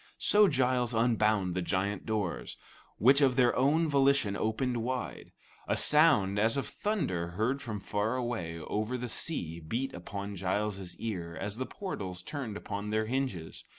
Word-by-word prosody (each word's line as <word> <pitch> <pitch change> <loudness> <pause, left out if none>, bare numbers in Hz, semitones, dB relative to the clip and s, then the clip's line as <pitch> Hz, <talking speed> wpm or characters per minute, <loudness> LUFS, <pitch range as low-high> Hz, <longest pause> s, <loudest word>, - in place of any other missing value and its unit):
So 210 0 +5
Giles 125 -5 +1
unbound 110 -5 +2
the 90 - -1
giant 95 +3 -1
doors, 105 -5 -2 0.4
which 135 +6 +5
of 130 -3 +4
their 125 -2 +4
own 150 +6 +3
volition 140 -7 +3
opened 120 +4 -1
wide. 125 +2 -4 0.4
A - - +1
sound 140 -11 +4
as 110 +5 +3
of 140 - -2
thunder 125 - -1
heard 125 +6 0
from 105 -3 -5
far 105 +4 -1
away 115 -10 -3
over 110 +9 -2
the 125 0 -5
sea 85 - -1
beat 115 +12 -3
upon 100 +3 -6
Giles's 95 -1 -2
ear 90 -7 -4
as 100 +2 -3
the 130 - -3
portals 95 - -5
turned 125 -7 -5
upon 100 0 -5
their 110 +1 +1
hinges. 120 -9 -3
110 Hz, 155 wpm, -30 LUFS, 100-130 Hz, 0.4 s, So